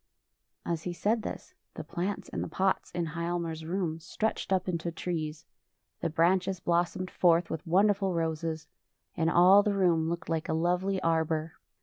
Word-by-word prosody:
As 170 -2 -2
he 175 +1 -4
said 220 +6 0
thisj - - -7 0.2
the - - -5
plants 190 +4 -3
in - - -4
the - - -3
pots 190 0 0
in 170 -1 -2
Hialmar's 170 0 -3
room 170 -2 -2
stretched 215 +5 -3
up 190 0 +1
into 170 -1 -2
trees: 160 -2 -4 0.5
the 165 - -1
branches 185 +3 +2
blos 175 0 +1
somed 185 -1 -5
forth 170 -1 +3
with 160 +2 -5
wonderful 195 +2 +3
roses, 160 -1 -2 0.5
and 165 -2 +1
all 180 +4 +7
the 205 -1 0
room 170 -4 +2
looked 170 0 -4
like 165 -1 -2
a - - +1
lovely 180 +4 +1
arbor. 160 -1 0
170 Hz, 165 wpm, -29 LUFS, 165-185 Hz, 0.5 s, all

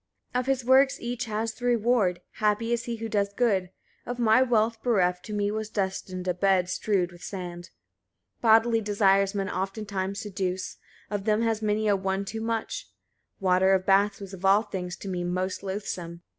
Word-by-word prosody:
49. 250 - +2
Of 250 - -2
his 265 -3 0
works 265 +1 +5
each 245 +1 -3
has 220 0 -2
the 245 - -8
reward: 230 -6 +2 0.2
happy 215 +2 +1
is 235 0 -1
he 235 - -3
who 225 0 -5
does 200 -2 -1
good. 195 -7 +1 0.3
Of 245 - -5
my 230 0 +4
wealth 225 -3 +2
bereft, 180 -7 +1
to 215 - -6
me 205 0 0
was 220 0 -3
destined 190 -2 -3
a 180 - +2
bed 185 0 +2
strewed 185 -2 0
with 175 0 -15
sand. 175 -3 -6 0.7
50. - - -45
Bodily 225 0 +5
desires 200 -1 +2
men 195 -1 -1
oftentimes 195 0 -3
seduce, 190 -2 -3 0.3
of 205 -1 -3
them 215 +1 +2
has 225 -1 0
many 215 0 0
a 205 - +4
one 190 0 -1
too 220 +3 -5
much: 225 0 -3 0.5
water 190 0 +4
of 185 -1 -1
baths 200 +1 +3
was 195 -1 -9
of 190 -1 -9
all 195 +3 +5
things 180 -4 -5
to - - -9
me 180 -2 -2
most 185 +1 -2
loathsome. 180 -3 -5
205 Hz, 190 wpm, -27 LUFS, 190-225 Hz, 0.7 s, works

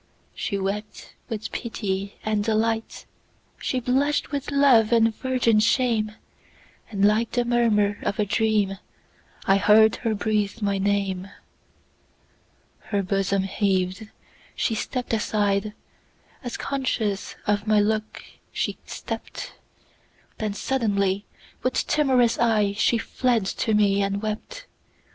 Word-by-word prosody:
She 200 - -3
wept 200 +2 -4 0.2
with 220 -2 -4
pity 200 -4 -3
and 215 -1 +1
delight, 225 +1 -1 0.5
She 255 - -1
blush'd 270 +4 +1
with 280 -2 -3
love 270 -6 +5
and 225 -1 +4
virgin 250 -4 +2
shame; 220 -1 +2 0.8
And 200 -2 +1
like 215 +2 +2
the 245 -1 +1
murmur 220 -4 +2
of 200 - -2
a 210 - +1
dream,I 205 -2 -1
heard 215 +2 +5
her 225 -3 -1
breathe 210 0 -1
my 200 -2 0
name. 195 -1 -1 1.6
Her 200 -2 -1
bosom 195 0 0
heaved—she 195 +4 -2
stepp'd 245 +3 -3
aside, 210 -2 0 0.7
As 245 -1 -4
conscious 235 -7 -2
of 205 0 0
my 215 -1 +4
look 215 +1 -1 0.3
she - - -2
stept—Then 215 -2 -8
suddenly, 205 -6 0 0.4
with 255 - 0
timorous 260 -6 +3
eyeShe 220 0 +2
fled 240 -3 0
to 220 +3 0
me 200 -1 +3
and 200 0 0
wept. 220 - -5
215 Hz, 110 wpm, -24 LUFS, 200-235 Hz, 1.6 s, love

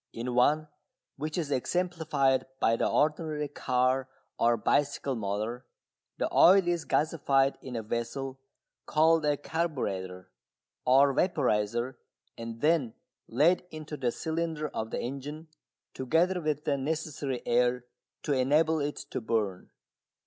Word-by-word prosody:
In 120 +2 -4
one, 150 +5 +3 0.5
which 155 +3 -4
is 155 -5 -2
exemplified 150 -3 0
by 115 - +3
the - - 0
ordinary 150 0 0
car 130 -1 0 0.3
or 120 0 +3
bicycle 140 0 +1
motor, 110 +3 -3 0.5
the - - 0
oil 190 0 +7
is 175 -2 0
gasified 140 -3 +2
in 130 -2 -7
a 115 - -3
vessel 125 +4 -4 0.5
called 160 +1 +4
a 145 -1 +2
carburetter 95 - -3 0.6
or 135 +2 +5
vaporiser 120 - 0 0.4
and 115 0 -7
then 150 -7 +2 0.3
led 155 +11 +3
into 155 -1 -7
the 125 -4 -1
cylinder 160 -1 -3
of 110 - -4
the - - -3
engine, 145 +5 -6 0.4
together 170 +7 +1
with 150 -2 -1
the 140 -2 0
necessary 145 -3 -3
air 125 +1 +2 0.4
to 145 - 0
enable 150 +5 +3
it 145 0 -2 0.2
to - - -3
burn. 105 -5 -2
140 Hz, 125 wpm, -29 LUFS, 120-155 Hz, 0.6 s, oil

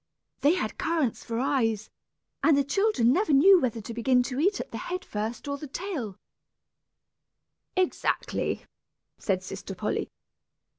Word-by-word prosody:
They 300 +5 +4
had 215 -12 -3
currants 315 -7 0
for 230 -1 -4
eyes, 225 -6 0 0.5
and 315 -3 +5
the 280 - +4
children 280 - +3
never 370 +1 +1
knew 360 +7 +7
whether 235 -3 -1
to 220 +3 -7
begin 250 +2 +3
to 255 +1 -4
eat 395 +6 +2
at - - -6
the - - -5
head 365 +1 -4
first 220 +6 -4
or 280 0 -3
the 300 - -7
tail 275 - -4 0.8
" - - -31
"Exactly," 370 -1 0 0.5
said 190 -2 0
sister 195 +1 -7
Polly. 210 +3 -2
265 Hz, 150 wpm, -27 LUFS, 225-335 Hz, 0.8 s, knew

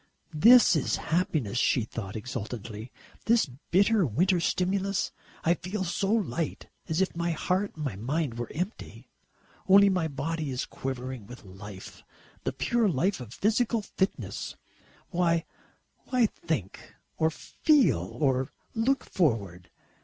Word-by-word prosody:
"This 225 +6 +7
is 150 - +1
happiness," 155 - 0
she 125 - +3
thought 105 -3 -6
exultantly, 110 -1 -6 0.3
"this 230 0 +4 0.2
bitter 200 +3 +4
winter 175 - +2
stimulus 190 +3 0 0.3
I 170 - +4
feel 190 +3 -4
so 195 +3 -1
light 195 -7 -1 0.2
as 160 +3 +1
if 190 - 0
my 170 0 -1
heart 185 +5 -1
and 135 -11 -4
mind 135 -1 -1
were 120 - -4
empty 180 +8 -5 0.6
only 200 +1 +8
my 180 -4 +1
body 155 +2 -3
is 130 -1 -2
quivering 130 -4 -5
with 125 +2 -11
life 95 0 -10 0.4
the - - +1
pure 235 -3 +1
life 180 +5 +1
of 120 -4 -9
physical 225 +1 +1
fitness. 190 0 -3 0.6
Why 170 -2 +2 0.9
think, 115 - -4 0.2
or 160 - +3
feel, 290 - +2 0.2
or 130 -3 +1 0.2
look 250 +4 +1
forward?" 100 - -1
160 Hz, 125 wpm, -28 LUFS, 125-195 Hz, 0.9 s, only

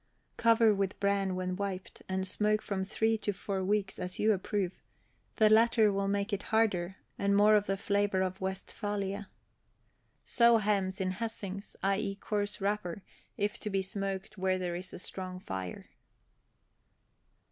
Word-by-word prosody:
Cover 230 -1 +5
with 195 -1 -1
bran 200 -2 +1
when 185 0 -2
wiped, 195 -1 -5
and 190 0 -1
smoke 210 +3 +1
from 195 -2 -2
three 220 +3 +1
to 205 -1 -1
four 190 0 -3
weeks, 195 0 0
as 180 0 -2
you 215 0 +4
approve; 190 -1 -2 0.5
the 215 - +5
latter 220 -1 +5
will 195 0 0
make 200 +1 0
it 200 - 0
harder, 195 -5 +2 0.2
and 200 0 +2
more 210 +1 +6
of 210 -1 +4
the 195 - 0
flavor 200 -1 +1
of 185 0 -3
Westphalia. 200 +1 -3 0.9
Sew 235 -1 +5
hams 200 -3 0
in 185 -1 0
hessings, 200 -1 -5
i. 195 0 +2
e. 200 -2 -2
coarse 205 0 -2
wrapper, 200 -2 -2 0.3
if 205 +1 -1
to 210 - -4
be 195 -1 0
smoked 195 +1 -4
where 185 0 +2
there 180 -1 -2
is 185 +2 -5
a - - -7
strong 185 0 -5
fire. 95 - -6
200 Hz, 160 wpm, -31 LUFS, 190-210 Hz, 0.9 s, more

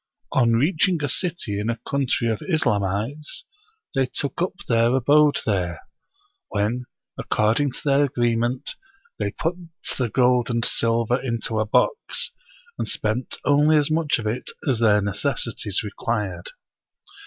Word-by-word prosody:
On 120 -3 +3
reaching 155 +6 +2
a - - +1
city 145 - -2
in 105 +2 -2
a 115 0 -2
country 135 -4 0
of 110 - -1
Islamites, 110 - 0 0.5
they 135 -2 +2
took 140 +5 -2
up 180 - 0
their 115 +1 +3
abode 145 +3 +4
there; 90 -6 -1 0.7
when, 110 +5 -1 0.3
according 115 +6 +1
to - - -7
their 140 0 +4
agreement, 120 +1 0 0.5
they - - 0
put 170 +2 -2 0.4
the 125 -3 +1
gold 125 0 +3
and 115 -1 +1
silver 115 +2 +1
into 115 -3 -2
a 110 - 0
box, 470 - +1 0.5
and - - -1
spent 110 +4 -2
only 150 +2 +5
as 150 0 +2
much 155 -2 +2
of 115 - -6
it 115 +4 -2 0.2
as 130 -5 +2
their 105 -3 +4
necessities 105 -1 -1
required. 105 -4 -3
120 Hz, 140 wpm, -23 LUFS, 110-145 Hz, 0.7 s, only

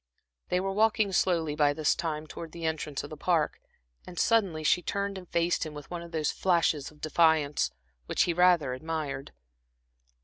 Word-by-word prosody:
They 180 - +2
were 195 +1 -1
walking 215 0 +2
slowly 165 -5 +1
by 145 -1 +3
this 155 0 +2
time 155 -3 -3
towards 160 +1 -9
the 170 -1 -6
entrance 155 -3 -2
of 145 - -9
the 155 - -7
Park, 160 -1 0 0.5
and 180 - -10
suddenly 195 -9 +2
she 180 - +3
turned 200 +1 -2
and 185 -2 -9
faced 170 +1 +1
him 155 -2 -7
with 150 +2 -10
one 175 -1 -4
of 170 0 -10
those 155 -2 0
flashes 165 -6 +1
of 150 -1 -20
defiance, 155 -2 +2 0.4
which - - +2
he 175 - 0
rather 175 -6 +4
admired. 150 -1 -4
165 Hz, 180 wpm, -29 LUFS, 150-180 Hz, 0.5 s, rather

